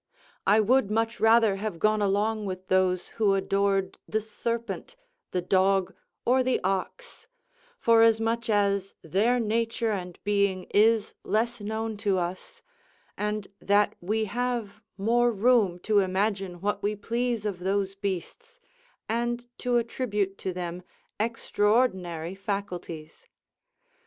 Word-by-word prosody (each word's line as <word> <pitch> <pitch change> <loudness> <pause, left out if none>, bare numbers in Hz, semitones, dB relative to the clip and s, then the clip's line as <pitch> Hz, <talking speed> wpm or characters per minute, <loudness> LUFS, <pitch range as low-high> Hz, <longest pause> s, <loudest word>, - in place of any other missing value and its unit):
I 205 +3 +6
would 235 0 +3
much 225 +2 0
rather 225 -3 +5
have 210 -3 -4
gone 215 +4 +2
along 205 +2 +1
with 185 0 -6
those 185 -1 +2
who 200 -2 +4
adored 195 0 0
the 220 - 0
serpent, 230 - -4 0.3
the 180 -1 -2
dog, 190 +1 +2 0.3
or 255 +2 +4
the 255 0 +1
ox; 195 - -3 0.5
forasmuch 230 - +3
as 200 -2 +1
their 210 +9 +2
nature 230 0 0
and 180 -4 -4
being 200 -2 +1
is 220 +1 +4
less 235 +2 0
known 220 +1 -3
to 200 -2 +1
us, 180 +1 -5 0.5
and 210 -1 -2
that 205 +1 +3
we 215 +5 0
have 235 -2 -3 0.2
more 240 +4 +3
room 215 -4 +3
to 210 -1 +3
imagine 190 -1 -1
what 205 0 -1
we 210 +1 0
please 235 +1 -2
of 200 -4 -2
those 195 +1 0
beasts, 200 - -5 0.5
and 240 +1 -1
to 245 -1 +1
attribute 210 -5 -1
to 190 - -3
them 175 0 -5 0.4
extraordinary 205 -6 0
faculties. 180 -5 -6
205 Hz, 125 wpm, -27 LUFS, 195-230 Hz, 0.5 s, I